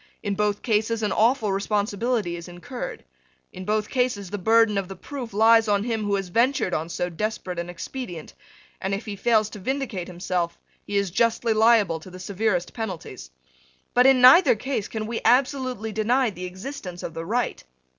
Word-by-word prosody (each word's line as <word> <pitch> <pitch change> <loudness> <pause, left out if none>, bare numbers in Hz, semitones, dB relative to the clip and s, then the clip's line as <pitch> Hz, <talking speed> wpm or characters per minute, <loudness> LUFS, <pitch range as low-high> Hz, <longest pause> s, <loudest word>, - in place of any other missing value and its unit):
In 205 - -1
both 205 0 -1
cases 220 0 0
an 210 - 0
awful 225 0 +2
responsibility 205 0 -1
is 170 0 -8
incurred. 180 - -7 0.5
In 185 - -8
both 210 +1 0
cases 245 -8 -1
the 205 - -3
burden 225 +2 +4
of 195 - -4
the 195 - -8
proof 255 +4 -7
lies 225 +2 +5
on 205 -1 +2
him 225 -2 -2
who 205 -1 +1
has 195 -2 -3
ventured 235 -1 +1
on 160 +2 -2
so 175 - -2
desperate 180 0 -4
an 170 0 -4
expedient; 175 -1 -7 0.5
and, 195 +1 -1
if 200 - -7
he 210 -2 -5
fails 215 +1 +2
to 210 - -8
vindicate 245 -5 -3
himself, 175 -1 -2 0.3
he 205 - -1
is 200 -3 0
justly 230 +3 +2
liable 215 -6 +4
to 175 - -12
the 185 - -10
severest 185 -1 -1
penalties. 185 - -6 0.6
But 250 +1 +5
in 265 -2 +5
neither 260 +4 +8
case 220 -1 -3
can 220 -1 -4
we 230 +1 -4
absolutely 255 -3 +1
deny 230 +3 +1
the 180 -1 -7
existence 185 -1 -7
of 165 - -5
the 165 0 -5
right. 230 +7 -2
210 Hz, 185 wpm, -24 LUFS, 185-235 Hz, 0.6 s, neither